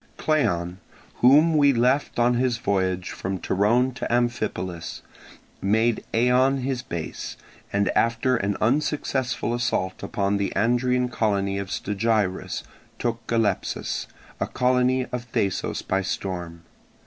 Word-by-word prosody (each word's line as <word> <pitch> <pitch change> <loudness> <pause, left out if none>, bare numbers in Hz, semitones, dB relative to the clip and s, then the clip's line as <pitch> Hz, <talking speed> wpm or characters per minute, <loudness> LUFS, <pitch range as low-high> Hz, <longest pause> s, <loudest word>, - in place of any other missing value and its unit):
Cleon, 90 - 0 0.4
whom 150 +6 +6
we 145 -2 +5
left 125 +4 +1
on 120 +1 +4
his 120 -1 +1
voyage 95 -4 -1
from 95 0 -3
Torone 115 +8 +2
to 120 - -4
Amphipolis, 110 -8 -2 0.6
made 110 +3 +2
Eion 125 +3 +3
his 130 -2 -1
base, 85 -9 -6 0.3
and 100 0 +1
after 115 +3 +2
an 100 -3 -1
unsuccessful 130 -1 0
assault 95 -6 -1
upon 100 0 0
the 100 -1 -1
Andrian 125 +2 +2
colony 100 -4 0
of 100 -1 -5
Stagirus, 105 -1 -1 0.3
took 115 -1 -3
Galepsus, 110 -5 -1 0.3
a - - -1
colony 125 0 +2
of 120 -1 -5
Thasos, 100 -4 -1
by 95 +1 0
storm. 90 -3 -4
115 Hz, 120 wpm, -24 LUFS, 100-125 Hz, 0.6 s, whom